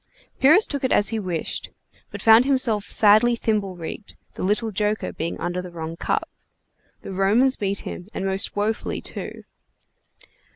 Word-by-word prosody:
Pyrrhus 310 +11 +6
took 280 -2 -5
it 260 - 0
as 205 - +3
he 225 -1 -2
wished 180 -5 -4
it, - - -30 0.4
but - - -8
found 225 +2 +7
himself 250 -7 +1
sadly 215 +3 +4
thimble 210 -5 -1
rigged, 175 +5 -8 0.2
the - - -8
little 215 +4 0
joker 210 +1 -1
being 165 - -4
under 175 +1 -2
the 180 - -9
wrong 165 -1 -6
cup. - - -2 0.8
The - - -7
Romans 215 +8 +3
beat 200 0 -1
him, 180 - -8
and 195 - -4
most 195 0 0
wofully 210 +2 -2
too. - - -6
210 Hz, 165 wpm, -23 LUFS, 190-230 Hz, 0.8 s, found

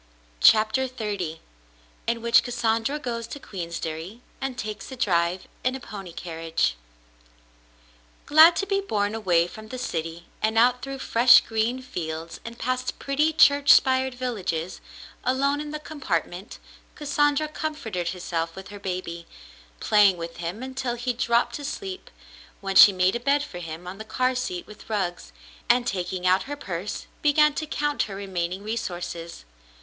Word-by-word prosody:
CHAPTER 220 - +5
XXX 205 -10 -4 0.7
IN 230 0 -1
WHICH 235 0 +6
CASSANDRA 235 +2 0
GOES 235 -5 -4
TO 285 - -7
QUEENSDERRY 170 - -6 0.2
AND 270 -2 -3
TAKES 215 +3 -6
A - - -6
DRIVE 180 -6 0 0.2
IN 255 +1 +1
A - - -5
PONY 200 -7 -8
CARRIAGE 165 - -2 1.5
Glad 315 +3 +8
to 395 - 0
be 395 0 0
borne 210 - -1
away 180 -6 +2
from 215 +5 -10
the 255 - -6
city 165 -7 -4 0.2
and 220 +1 +1
out 245 +2 +4
through 275 0 -5
fresh 245 -1 +6
green 230 +3 -1
fields 165 -8 -5
and 230 +1 -8
past 255 +1 -2
pretty 295 +3 +1
church 285 -2 +6
spired 260 -1 +3
villages, 190 -9 -3 0.4
alone 275 +3 +1
in 300 - -6
the 305 - -4
compartment, 205 - -4 0.4
Cassandra 290 0 +1
comforted 235 - -3
herself 170 -2 -3
with 190 0 -9
her 205 -1 -9
baby, 180 -3 -5 0.5
playing 205 -3 +5
with 165 0 -7
him 175 +8 -5
until 260 -2 -3
he 245 +1 -2
dropped 235 0 +1
to 290 - -8
sleep, 380 +6 -6 0.5
when 195 -1 -4
she 205 - +10
made 185 +2 +2
a - - -1
bed 280 +3 +2
for 180 -11 -8
him 165 0 -7
on 185 +3 -8
the - - -5
car 255 +3 0
seat 215 -8 -3
with 210 - -14
rugs, 180 - -2 0.4
and, 245 0 +4
taking 185 -3 -3
out 185 +7 +3
her 290 - -3
purse, 185 -5 -5 0.2
began 300 0 +4
to 310 +1 -4
count 295 0 -1
her 195 - -3
remaining 190 -1 -3
resources. 175 - -5
220 Hz, 155 wpm, -25 LUFS, 180-260 Hz, 1.5 s, she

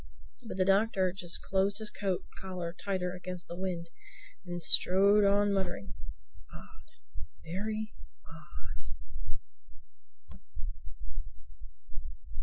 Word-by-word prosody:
But 225 -5 -6
the 185 - +4
Doctor 195 -2 +4
just 175 -2 -4
closed 195 +1 +3
his 215 -1 -2
coat 195 -3 0 0.2
collar 180 -3 -3
tighter 185 -2 0
against 180 -1 -6
the 170 - -5
wind 175 -2 -2 0.5
and 175 -1 -3
strode 200 +4 +6
on 200 0 +5
muttering, 190 - -1 0.6
"Odd—very 205 - -6 0.3
odd!" 120 - -10
185 Hz, 85 wpm, -33 LUFS, 175-200 Hz, 0.6 s, strode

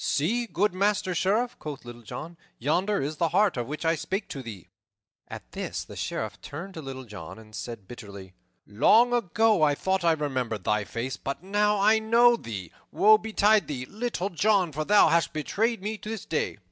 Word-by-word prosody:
"See, 225 +12 0
good 205 -1 +1
Master 195 -1 +1
Sheriff," 210 +8 0
quoth 145 -4 -7
Little 120 0 -10
John, 160 +9 -8 0.2
"yonder 180 - 0
is 150 +2 -4
the 165 0 +1
hart 200 +5 +3
of 120 -2 -3
which 150 +3 -5
I 165 - +4
spake 195 +5 -3
to 135 - -5
thee." 105 -8 -9 0.6
At - - -10
this - - -4
the - - -12
Sheriff - - -4
turned 170 +7 -8
to 160 - -7
Little 135 -2 -7
John 100 -8 -9
and 110 -1 -15
said 115 -5 -7
bitterly, 100 -6 -10 0.3
"Long 220 - +4
ago 220 -3 +2
I 145 -2 +4
thought 190 +4 0
I 165 -1 +4
remembered 130 -9 -2
thy 105 +1 +1
face, 115 +3 -4
but 135 - -5
now 205 +1 +1
I 215 +2 +5
know 235 +2 +5
thee. 100 - -7 0.2
Woe 215 +1 +6
betide 215 -1 +3
thee, 130 -4 -4
Little 205 - -3
John, 195 -1 +2
for 155 +2 -3
thou 210 +3 +6
hast 170 0 +2
betrayed 210 - -1
me 215 +1 -3
this 220 -1 -6
day." 155 - -2
170 Hz, 190 wpm, -27 LUFS, 130-210 Hz, 0.6 s, Woe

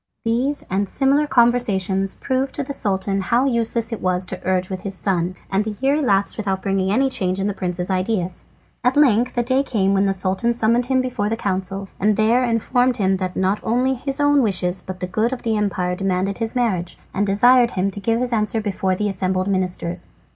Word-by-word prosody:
These 255 +6 0
and 195 +1 -1
similar 280 +2 +2
conversations 220 -7 +1
proved 265 0 -2
to 285 - -2
the 280 - -5
Sultan 195 -3 0
how 240 +7 +1
useless 235 -2 0
it 225 - -5
was 185 0 0
to 185 0 -7
argue 185 0 0
with 185 - -5
his 195 -1 -4
son, 185 -2 -1 0.2
and 195 +2 +2
the 215 -1 -5
year 270 +1 +2
elapsed 200 -9 +1
without 195 -3 -2
bringing 195 -1 0
any 265 +6 +3
change 185 -7 0
in 195 - -1
the 205 - 0
prince's 180 -1 -3
ideas. 185 -1 -1 0.4
At 250 +3 +2
length 250 -4 +3
a 240 - +2
day 260 +3 +2
came 200 -8 0
when 195 0 +2
the - - +2
Sultan 190 +5 0
summoned 235 +1 +1
him 260 0 +2
before 245 -5 -2
the 225 - -1
council, 195 -1 -3
and 210 +1 +2
there 225 +4 +3
informed 245 +1 +1
him 190 -2 +1
that 185 -1 -4
not 190 +2 +1
only 250 +3 +1
his 270 +2 -2
own 290 -1 +4
wishes 190 -5 0
but 185 -1 -8
the - - 0
good 215 +6 0
of 260 - -5
the 225 -1 0
empire 190 -4 -1
demanded 195 +1 -1
his 225 +1 -1
marriage, 195 -8 -1 0.2
and 205 +1 0
desired 240 +5 +5
him 195 +2 +1
to 205 - -7
give 225 +3 0
his 250 -1 -1
answer 215 0 0
before 195 -3 -1
the 210 +3 -1
assembled 185 -1 -1
ministers. 180 -2 -2
205 Hz, 210 wpm, -21 LUFS, 190-240 Hz, 0.4 s, desired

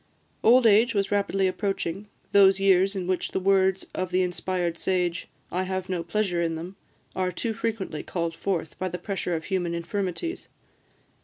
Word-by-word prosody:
Old 245 +2 +6
age 225 +2 +5
was 195 -1 0
rapidly 200 -1 +1
approaching, 195 0 -2 0.2
those 195 -1 +6
years 195 0 +4
in 185 -2 -2
which 185 0 -1
the - - +1
words 190 0 +2
of 185 -1 -2
the 185 +1 +2
inspired 175 -1 -2
sage, 180 -2 -1 0.2
"I 180 - 0
have 190 0 -3
no 180 -2 -1
pleasure 180 0 -1
in 165 -1 0
them," 175 +4 -7 0.4
are 185 -1 0
too 225 +4 -2
frequently 215 -7 -3
called 170 -2 -3
forth 170 -4 -3
by 185 - -1
the 180 - -4
pressure 180 -1 -3
of 160 - -4
human 175 -3 -1
infirmities. 195 - -3
185 Hz, 170 wpm, -26 LUFS, 175-195 Hz, 0.4 s, Old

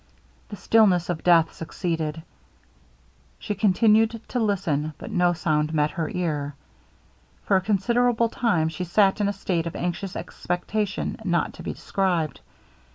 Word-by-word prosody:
The 205 - -6
stillness 195 -5 +3
of 170 -3 -3
death 165 -2 +4
succeeded. 160 -2 -3 1.1
She - - -4
continued 220 +3 +3
to 250 - -1
listen; 170 -9 0
but - - -8
no 180 -1 +3
sound 155 -2 0
met 150 0 +2
her 165 -4 -3
ear. 150 -5 -2 0.9
For 200 - +3
a - - 0
considerable 235 +4 +2
time 205 -11 +1
she 165 +3 -5
sat 195 +3 +2
in 205 - +2
a - - +1
state 175 -4 -2
of 170 - -6
anxious 180 +2 -3
expectation 200 +3 -3
not 175 -4 0
to - - -11
be - - -4
described. 175 -7 -1
180 Hz, 145 wpm, -24 LUFS, 165-210 Hz, 1.1 s, death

